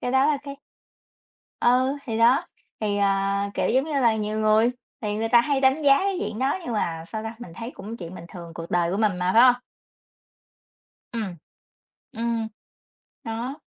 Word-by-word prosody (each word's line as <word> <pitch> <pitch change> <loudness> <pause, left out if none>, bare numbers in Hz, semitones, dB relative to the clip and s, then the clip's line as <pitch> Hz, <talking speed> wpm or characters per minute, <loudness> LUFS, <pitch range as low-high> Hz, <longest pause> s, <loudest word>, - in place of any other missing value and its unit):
Cái 245 - -2
đó 265 +1 +4
là 300 -1 +3
cái 280 -1 -8 1.0
Ừ, 255 +3 +3
thì 225 -2 -3
đó, 235 +4 +5 0.4
thì, 205 -1 0
à, 200 0 +1
kiểu, - - 0
giống 260 +4 +3
như 315 - -5
là, 230 -3 +4
nhiều 215 0 -2
người 215 +2 +4 0.3
thì 210 -2 -2
người 225 +1 -1
ta 235 +1 +6
hay 275 +2 0
đánh 265 +3 +3
giá 275 -1 +6
cái 390 -1 -1
diện 220 - -3
đó 265 +7 +1
nhưng 245 - -3
mà 165 -6 -2
sao 220 +2 -5
ta? 225 +1 -5
Mình 210 -9 -10
thấy 230 +6 -6
cũng 225 0 -8
chuyện 170 -2 -8
bình 170 - -9
thường, 170 -2 -10
cuộc 165 0 -7
đời 175 -1 +2
của 190 - -1
mình 210 -3 +1
mà, 180 0 +1
phải 230 - +8
hông? 250 -1 +7 1.6
Ừm, 210 -6 -4 0.8
ừm, 230 -1 -2 0.8
đó. 235 +5 -4
225 Hz, 190 wpm, -25 LUFS, 200-255 Hz, 1.6 s, phải